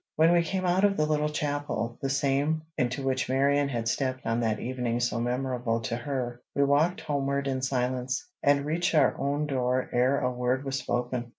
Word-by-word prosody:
When 160 +2 +5
we 175 - +5
came 185 +2 -2
out 180 +2 +2
of 200 -1 +3
the 155 - +2
little 150 0 +1
chapel, 145 -6 -2
the 135 - -1
same 145 +3 +1
into 125 +2 -1
which 130 -1 0
Marion 140 +2 +2
had 115 -3 -2
stepped 130 +2 -1
on 115 +1 0
that 110 -2 0
evening 125 -1 -2
so 120 -1 0
memorable 125 -1 -1
to 115 - -2
her, 120 -1 -4
we 140 - +3
walked 150 +6 +2
homeward 140 -1 -1
in 130 -1 -1
silence, 130 - -1
and 140 0 +3
reached 170 +3 0
our 145 -4 +4
own 145 +2 0
door 130 -2 0
ere 130 +3 +3
a 125 - 0
word 125 +2 -1
was 135 0 -1
spoken. 120 0 -2
135 Hz, 195 wpm, -28 LUFS, 125-145 Hz, -, When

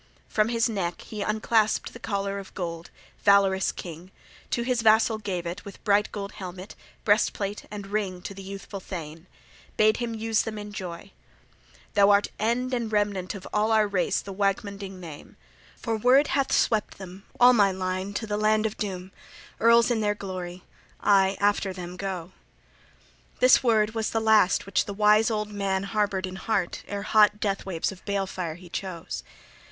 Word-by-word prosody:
From 215 +1 +1
his 230 0 +2
neck 185 -6 -3
he 215 -2 -7
unclasped 215 +1 +1
the 235 - -10
collar 200 -3 -2
of 195 - -11
gold, 170 -2 -5 0.3
valorous 195 -1 +4
king, 175 +1 -9 0.4
to 235 - 0
his 245 -1 0
vassal 220 0 +4
gave 185 -4 -3
it 175 +3 -5
with 200 - -11
bright 205 0 +2
gold 200 -1 -5
helmet, 185 0 -8 0.3
breastplate, 205 -1 +1
and 205 -1 -7
ring, 195 -3 -3
to - - -6
the 195 - -10
youthful 195 +1 -7
thane: 165 -2 -8 0.5
bade 215 0 +4
him 235 -2 -3
use 225 0 +1
them 220 -1 -5
in 205 0 -7
joy. 185 -1 -7 0.8
"Thou 200 -1 +5
art 205 0 +4
end 245 +4 0
and 235 -3 -1
remnant 205 -3 0
of 190 - -8
all 215 +1 +2
our 215 -1 +4
race 200 -3 0
the 200 - -8
Waegmunding 195 -1 -2
name. 160 -5 -11 0.4
For 225 -2 -2
Wyrd 260 +6 +5
hath 275 -1 +1
swept 215 -3 +1
them, 190 0 -10
all 245 +1 +8
my 205 -4 +4
line, 185 +1 -3
to 220 - -2
the 210 -1 -2
land 215 +1 +2
of 220 - -2
doom, 190 -3 -4 0.5
earls 235 +1 +5
in 225 -2 +1
their 210 -1 +1
glory: 185 -2 -6 0.4
I 195 -1 +3
after 205 -1 +1
them 180 -1 -7
go." 185 -2 -5 1.1
This 255 +1 +6
word 220 -3 +2
was 225 -1 -1
the 225 - 0
last 220 -4 +4
which 195 -1 +1
the 200 - -6
wise 210 +2 +4
old 210 -1 -2
man 195 -2 -1
harbored 200 -2 0
in 185 0 -7
heart 190 -3 -1
ere 200 0 -4
hot 210 0 +4
death 200 -2 -2
waves 170 -1 -1
of 190 - -13
balefire 190 -5 -2
he 180 0 -13
chose. 175 -1 -5
200 Hz, 175 wpm, -26 LUFS, 190-215 Hz, 1.1 s, all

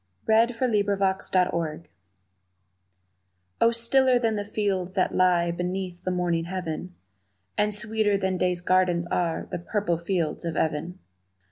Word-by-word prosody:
The 220 - +2
Fields 235 -1 -9
of 255 -3 +1
Even 190 -5 0 1.8
O 230 - +6
STILLER 250 +2 +3
than 225 -2 0
the 205 - -2
fields 200 -3 -2
that 185 - +1
lie 175 -2 +3
Beneath 180 +1 -4
the - - -1
morning 175 -2 0
heaven, 180 0 -5 0.6
And 210 0 +1
sweeter 210 -1 0
than 190 -1 -1
day's 180 -1 0
gardens 180 -1 +2
are 170 -2 -1
The - - -3
purple 175 -2 -1
fields 170 -3 -1
of 165 -2 -3
even! 160 +3 -1
185 Hz, 135 wpm, -26 LUFS, 175-210 Hz, 1.8 s, O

